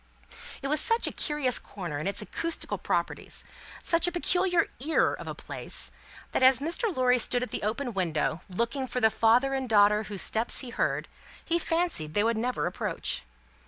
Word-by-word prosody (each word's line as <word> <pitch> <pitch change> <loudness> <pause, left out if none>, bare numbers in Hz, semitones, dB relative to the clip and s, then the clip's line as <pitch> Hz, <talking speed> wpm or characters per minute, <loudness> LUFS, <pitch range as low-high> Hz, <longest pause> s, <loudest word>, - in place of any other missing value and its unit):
It - - -1
was 300 +1 +2
such 455 +1 +3
a - - -1
curious 295 -5 0
corner 175 -8 -6
in 155 - -3
its 200 +1 -2
acoustical 335 +9 -2
properties, - - -2 0.4
such 335 +1 +3
a - - 0
peculiar 355 0 +1
Ear 310 +5 +2
of - - -7
a - - -5
place, - - -3 0.4
that - - 0
as 260 0 +7
Mr. 330 - 0
Lorry 250 -1 +3
stood 245 +1 +1
at 250 - -6
the - - -3
open 235 +4 -2
window, 170 -3 -1
looking 235 +7 -2
for 250 - -2
the 220 -2 +4
father 245 +6 +3
and 265 -2 -2
daughter 210 0 +4
whose 200 -3 -3
steps 225 +2 +3
he 255 -3 -7
heard, - - -1 0.4
he 340 +1 +1
fancied 330 - 0
they 205 - +3
would 230 +1 +1
never 230 -8 -1
approach. 175 - -2
250 Hz, 185 wpm, -28 LUFS, 210-300 Hz, 0.4 s, as